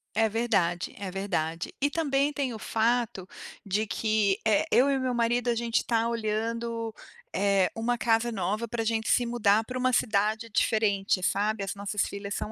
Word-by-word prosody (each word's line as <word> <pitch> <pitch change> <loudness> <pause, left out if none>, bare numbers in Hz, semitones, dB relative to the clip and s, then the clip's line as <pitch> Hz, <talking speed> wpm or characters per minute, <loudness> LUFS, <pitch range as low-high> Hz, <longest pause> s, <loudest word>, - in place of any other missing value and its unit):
É 220 0 +3
verdade, 190 -6 0
é 195 -2 -5
verdade. 170 -4 -3
E 285 - +3
também 285 -2 +1
tem 270 -4 -2
o - - -6
fato, 225 -5 0 0.4
de 205 +3 0
que, 215 -1 +1
eh, 220 +7 +3
eu 270 +3 +5
e 275 - +2
o - - -2
meu 255 -1 0
marido 240 +1 +1
a 235 - +2
gente 235 0 0
está 230 -1 +1
olhando, 230 0 -2 0.4
eh, 200 -2 +2
uma 240 +2 0
casa 230 +1 +2
nova 210 +3 -2
para 225 0 -2
gente 220 0 -1
se 245 - +3
mudar 220 -2 +3
para 250 +3 -6
uma 255 0 +1
cidade 215 0 +1
diferente, 205 -3 +1
sabe. 205 +2 0
As 195 +1 -4
nossas 200 0 -1
filhas 200 0 -6
são 215 - -4
220 Hz, 180 wpm, -28 LUFS, 200-235 Hz, 0.4 s, eu